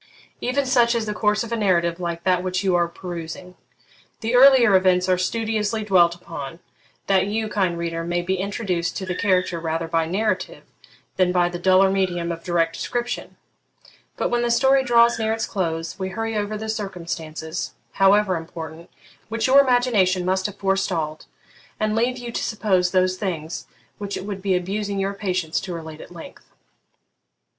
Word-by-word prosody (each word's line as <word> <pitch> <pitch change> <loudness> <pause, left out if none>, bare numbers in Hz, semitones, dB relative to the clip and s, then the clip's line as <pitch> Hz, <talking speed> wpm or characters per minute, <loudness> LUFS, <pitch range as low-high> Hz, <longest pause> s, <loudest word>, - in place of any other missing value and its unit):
Even 275 +3 0
such 240 -2 +3
is 230 -2 0
the 210 - -2
course 210 0 +1
of 230 - -8
a - - +1
narrative 175 -5 +1
like 170 -1 -4
that 180 -1 +2
which 185 +1 -2
you 190 -2 +2
are 175 -1 +3
perusing. 175 +1 -7 0.7
The 225 +2 -2
earlier 250 -4 +7
events 185 -1 +3
are 185 - +4
studiously 220 +2 -1
dwelt 175 -4 +4
upon, 165 -2 -8 0.5
that 195 -1 +2
you, 220 +1 -1
kind 190 -5 0
reader, 165 0 -3
may 175 +1 -1
be 190 +2 -1
introduced 185 -3 -2
to 190 - -4
the 185 - -2
character 185 -2 +1
rather 165 0 -2
by 165 0 0
narrative 195 +2 -2 0.5
than 185 -1 +3
by 175 -1 +2
the 175 0 -6
duller 190 +1 +4
medium 175 -3 0
of 165 0 -6
direct 165 -2 +1
description; 240 +5 -4 0.8
but - - 0
when 240 0 +1
the 240 - 0
story 265 +3 +4
draws 235 -2 +4
near 220 0 +1
its 225 - -2
close, 165 -2 -3
we 190 0 -2
hurry 225 +3 -3
over 210 0 -2
the 220 +1 -6
circumstances, 170 -7 -5 0.2
however 195 -1 +3
important, 165 0 -8 0.4
which 225 0 -1
your 275 +2 +7
imagination 230 -9 +2
must 190 +1 +1
have 205 - -9
forestalled, 185 -5 -1 0.5
and 215 0 0
leave 245 +3 +1
you 240 -1 -6
to - - -3
suppose 195 -5 +1
those 185 0 +2
things 170 -5 -4 0.3
which 200 -1 -4
it 185 - -6
would 200 -2 -5
be 190 -1 +1
abusing 200 +3 -2
your 195 +1 -1
patience 185 -5 -1
to 180 -2 -6
relate 160 -1 -8
at - - -11
length. 170 -2 -12
190 Hz, 175 wpm, -23 LUFS, 175-215 Hz, 0.8 s, earlier